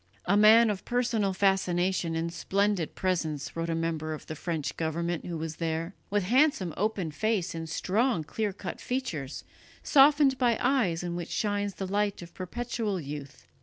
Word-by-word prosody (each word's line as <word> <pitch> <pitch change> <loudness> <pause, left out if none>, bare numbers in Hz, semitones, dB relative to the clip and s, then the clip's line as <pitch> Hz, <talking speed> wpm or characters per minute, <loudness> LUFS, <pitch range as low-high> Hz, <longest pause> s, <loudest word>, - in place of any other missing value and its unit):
"A 200 - +3
man 215 +2 +7
of 195 - -5
personal 235 -5 0
fascination 185 -3 +1
and 165 +1 -2
splendid 200 -3 0
presence," 160 -6 -2
wrote 165 0 -2
a 165 - 0
member 160 -1 -2
of - - -12
the 155 - -6
French 160 -2 -3
government 170 +1 -2
who 170 -2 -3
was 160 -1 -5
there, 165 +2 -2 0.2
"with 205 -1 +1
handsome 240 - +2
open 195 -5 -1
face 215 +1 -1
and 165 -1 -5
strong 200 +2 +1
clear 210 +6 -2
cut 190 -1 -7
features, 175 - -3 0.4
softened 280 -1 +5
by 240 -3 +3
eyes 240 -11 +1
in 175 -1 -3
which 175 -1 -5
shines 205 -2 -1
the 195 - -4
light 200 0 -1
of 170 - -13
perpetual 215 +1 -3
youth. 145 -2 -8
185 Hz, 165 wpm, -28 LUFS, 165-215 Hz, 0.4 s, man